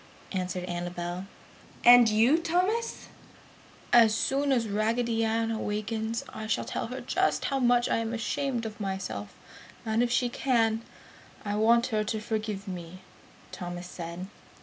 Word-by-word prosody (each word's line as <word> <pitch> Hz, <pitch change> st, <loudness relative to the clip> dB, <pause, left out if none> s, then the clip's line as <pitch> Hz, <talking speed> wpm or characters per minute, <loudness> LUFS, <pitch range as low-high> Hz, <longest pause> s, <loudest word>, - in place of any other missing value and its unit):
answered 180 Hz, -1 st, -2 dB
Annabel, 175 Hz, +1 st, -4 dB, 0.6 s
"And 240 Hz, -1 st, +9 dB
you, 230 Hz, +9 st, +4 dB
Thomas?" 365 Hz, +8 st, -1 dB, 0.9 s
"As 225 Hz, -3 st, +7 dB
soon 275 Hz, +3 st, +1 dB
as 240 Hz, -4 st, +2 dB
Raggedy 225 Hz, +2 st, 0 dB
Ann 225 Hz, 0 st, 0 dB
awakens, 220 Hz, +1 st, -2 dB
I 220 Hz, -, -6 dB
shall 220 Hz, -, 0 dB
tell -, -, -3 dB
her -, -, -6 dB
just -, -, 0 dB
how 275 Hz, -1 st, 0 dB
much 245 Hz, -1 st, +3 dB
ashamed 230 Hz, +2 st, -1 dB
I -, -, -1 dB
am -, -, -11 dB
of 210 Hz, -, -19 dB
myself 190 Hz, -, -4 dB, 0.5 s
and 220 Hz, +1 st, +1 dB
if 245 Hz, -, +2 dB
she 245 Hz, +1 st, +2 dB
can, 230 Hz, -3 st, +1 dB, 0.6 s
I 205 Hz, -, -1 dB
want 230 Hz, +3 st, +4 dB
her 215 Hz, 0 st, +2 dB
to 220 Hz, +1 st, -2 dB
forgive 215 Hz, -2 st, -3 dB
me!" 180 Hz, 0 st, -7 dB, 0.5 s
Thomas 175 Hz, 0 st, -6 dB
said. 175 Hz, 0 st, -6 dB
220 Hz, 145 wpm, -28 LUFS, 195-240 Hz, 0.9 s, And